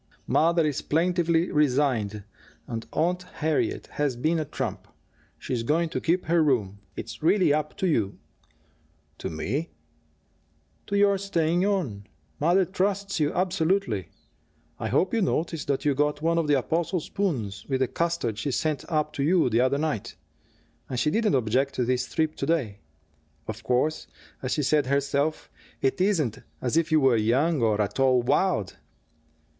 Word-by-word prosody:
"Mother 165 0 +3
is 150 -3 -1
plaintively 170 +1 +1
resigned 125 -8 +1 0.4
and 115 -1 -5
Aunt 175 +4 0
Harriet 160 -4 -1
has 145 -4 -2
been 160 +7 0
a 155 - -2
trump. - - -4 0.5
She's 125 -3 -3
going 160 +8 +1
to - - -3
keep 175 +3 +1
her 165 +1 +3
room. 105 -9 0 0.2
It's 110 0 -7
really 175 -1 +4
up 150 0 -2
to - - -1
you." 110 - 0 1.0
"To - - -4
me?" 125 - -3 1.2
"To 200 - 0
your 200 -1 +4
staying 175 -1 +1
on. 135 - -2 0.3
Mother 175 +5 +3
trusts 195 +1 -1
you 150 -1 +2
absolutely. 175 - 0 0.7
I 110 - -2
hope 140 - +1
you 230 - +2
noticed 165 -3 -1
that 140 0 -1
you 145 - +3
got 150 +1 0
one 165 +2 +1
of 165 - 0
the 145 -1 +4
apostle 165 +7 0
spoons 140 - -3
with 135 -1 0
the 130 - +3
custard 165 -11 -1
she 125 - -2
sent 150 +3 -1
up 150 -1 0
to 140 - -2
you 165 -4 +3
the 115 +2 +3
other 130 +2 +2
night. 150 -8 -2 0.7
And 125 - -2
she 150 +6 +2
didn't 215 -4 +2
object 130 +3 +1
to 125 - 0
this 125 0 -1
trip 155 -1 0
to - - -3
day. 130 -12 0 0.7
Of 110 +1 -5
course, 130 +5 0 0.3
as 130 - -2
she 150 - 0
said 145 0 +2
herself, 140 +2 0 0.3
it 135 +6 0
isn't 155 - +1 0.2
as 125 +3 -1
if 165 0 +2
you 155 - +5
were 135 -4 +4
young, 130 +8 +2
or 110 -2 +2
at 105 +4 -1
all 130 -2 +4
wild." 145 - +1
150 Hz, 165 wpm, -26 LUFS, 125-170 Hz, 1.2 s, you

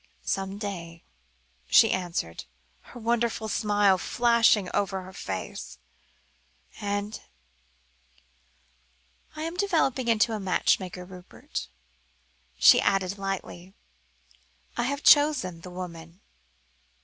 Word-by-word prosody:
"Some 195 0 -2
day," 170 -5 -6 0.7
she 225 - +6
answered, 175 - -3 0.4
her 245 - -13
wonderful 235 -1 -1
smile 205 -3 +2
flashing 235 -4 +3
over 195 -1 -1
her 185 +1 -12
face; 95 - -6 1.0
"and 205 +1 -3 2.1
I 310 - -5
am 330 +2 -5
developing 315 -10 +1
into 225 0 +2
a 215 - -3
matchmaker, 185 -1 0
Rupert," 180 - -8 0.9
she - - +7
added 195 0 0
lightly. 190 -1 -5 1.0
"I 240 - 0
have 280 +2 -2
even - - -18
chosen 285 - -2
the 180 - -9
woman. 170 -1 -9
200 Hz, 100 wpm, -27 LUFS, 180-235 Hz, 2.1 s, she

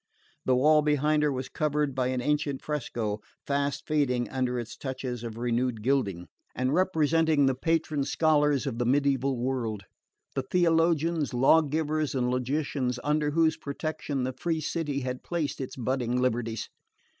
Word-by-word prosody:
The 130 - +3
wall 150 +4 +5
behind 150 0 +2
her 150 -1 +2
was 130 -1 -3
covered 150 -2 0
by 130 -1 0
an 130 -1 -1
ancient 145 0 -1
fresco, 115 -8 -3 0.2
fast 140 0 -1
fading 125 -5 +1
under 125 -2 -1
its 120 -1 -6
touches 130 -3 -5
of 115 -1 -6
renewed 120 -1 -1
gilding, 100 -10 0 0.3
and 130 +2 0
representing 160 -4 +3
the 135 - +3
patron 155 +1 0
scholars 150 -2 +2
of 125 -4 -3
the 120 - +1
mediaeval 135 -1 +2
world: 120 -5 -2 0.5
the 135 - 0
theologians, 165 -2 +2
law 135 +6 +6
givers 155 0 -1
and 125 -1 +1
logicians 130 0 -1
under 150 +1 +1
whose 160 +1 +2
protection 140 -1 -3
the 130 +1 -2
free 160 +5 -1
city 150 -2 -2
had 125 0 -4
placed 155 -6 -3
its 130 - -5
budding 125 0 -1
liberties. 115 -3 -1
140 Hz, 155 wpm, -28 LUFS, 125-150 Hz, 0.5 s, law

